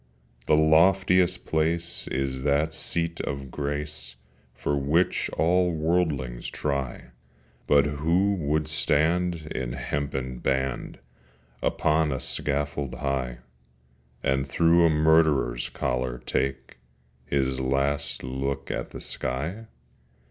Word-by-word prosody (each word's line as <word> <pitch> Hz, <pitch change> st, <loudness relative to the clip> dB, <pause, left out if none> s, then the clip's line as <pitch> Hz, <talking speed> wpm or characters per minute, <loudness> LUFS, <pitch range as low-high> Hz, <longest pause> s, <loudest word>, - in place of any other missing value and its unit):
The 75 Hz, -, +5 dB
loftiest 90 Hz, +3 st, +4 dB
place 80 Hz, +2 st, -1 dB
is 65 Hz, 0 st, -2 dB
that 75 Hz, +3 st, +1 dB
seat 85 Hz, +2 st, -1 dB
of 70 Hz, -2 st, -5 dB
grace 75 Hz, -3 st, -3 dB, 0.4 s
For 75 Hz, -, -1 dB
which 75 Hz, +6 st, +1 dB
all 90 Hz, +1 st, +3 dB
worldlings 75 Hz, -7 st, 0 dB
try: 70 Hz, -4 st, -3 dB, 0.6 s
But 70 Hz, -1 st, +5 dB
who 85 Hz, +8 st, +1 dB
would 75 Hz, -4 st, 0 dB
stand 80 Hz, +2 st, +2 dB
in 60 Hz, -2 st, -3 dB
hempen 65 Hz, -3 st, -3 dB
band 65 Hz, -1 st, -1 dB, 0.6 s
Upon 75 Hz, 0 st, +1 dB
a 65 Hz, -, -2 dB
scaffold 70 Hz, -1 st, -2 dB
high, 65 Hz, -3 st, -2 dB, 0.8 s
And 70 Hz, 0 st, +1 dB
through 85 Hz, +3 st, +4 dB
a -, -, +3 dB
murderer's 75 Hz, -6 st, +3 dB
collar 60 Hz, -1 st, -2 dB
take 65 Hz, 0 st, -3 dB, 0.5 s
His 65 Hz, -2 st, 0 dB
last 70 Hz, +2 st, 0 dB
look 70 Hz, +2 st, -3 dB
at -, -, -3 dB
the -, -, -9 dB
sky? 80 Hz, -, -4 dB
70 Hz, 105 wpm, -26 LUFS, 65-80 Hz, 0.8 s, The